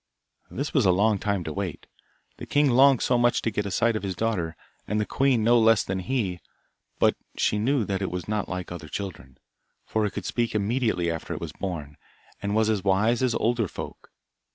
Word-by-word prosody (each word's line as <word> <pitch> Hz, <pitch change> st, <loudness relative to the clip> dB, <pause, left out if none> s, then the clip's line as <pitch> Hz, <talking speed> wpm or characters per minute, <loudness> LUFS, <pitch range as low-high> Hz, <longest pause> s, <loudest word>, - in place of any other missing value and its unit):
This 140 Hz, +4 st, -4 dB
was 130 Hz, -9 st, +3 dB
a -, -, +6 dB
long 105 Hz, +3 st, +2 dB
time 100 Hz, -3 st, -1 dB
to 80 Hz, -, -5 dB
wait. 95 Hz, -3 st, -4 dB, 0.5 s
The -, -, -8 dB
king 145 Hz, -2 st, +3 dB
longed 135 Hz, +1 st, +5 dB
so 125 Hz, -1 st, +2 dB
much 120 Hz, 0 st, +2 dB
to 115 Hz, -, 0 dB
get 105 Hz, 0 st, -2 dB
a -, -, -3 dB
sight 115 Hz, +4 st, +2 dB
of 110 Hz, -, -2 dB
his 95 Hz, -2 st, -3 dB
daughter, 95 Hz, -6 st, -1 dB, 0.3 s
and 105 Hz, +1 st, 0 dB
the 105 Hz, -, 0 dB
queen 135 Hz, -3 st, +2 dB
no 120 Hz, +2 st, +5 dB
less 115 Hz, -1 st, +5 dB
than 95 Hz, 0 st, -3 dB
he, 95 Hz, -3 st, -2 dB, 0.6 s
but -, -, +3 dB, 0.2 s
she 105 Hz, -, +1 dB
knew 125 Hz, +1 st, +1 dB
that 95 Hz, 0 st, -2 dB
it 95 Hz, -, -1 dB
was 90 Hz, +1 st, -5 dB
not 105 Hz, -1 st, -2 dB
like 90 Hz, -1 st, -5 dB
other 85 Hz, -3 st, -7 dB
children, 75 Hz, -7 st, -7 dB, 0.5 s
for 110 Hz, -1 st, 0 dB
it 100 Hz, -, -7 dB
could -, -, -5 dB
speak 120 Hz, -2 st, -1 dB
immediately 105 Hz, -5 st, +1 dB
after 80 Hz, -1 st, -4 dB
it -, -, -5 dB
was -, -, -5 dB
born, 80 Hz, -7 st, -5 dB, 0.4 s
and 100 Hz, +1 st, -1 dB
was 110 Hz, 0 st, +3 dB
as 105 Hz, -4 st, 0 dB
wise 105 Hz, +5 st, +2 dB
as 125 Hz, -3 st, +1 dB
older 115 Hz, -2 st, +1 dB
folk. -, -, -9 dB
105 Hz, 215 wpm, -26 LUFS, 95-115 Hz, 0.6 s, a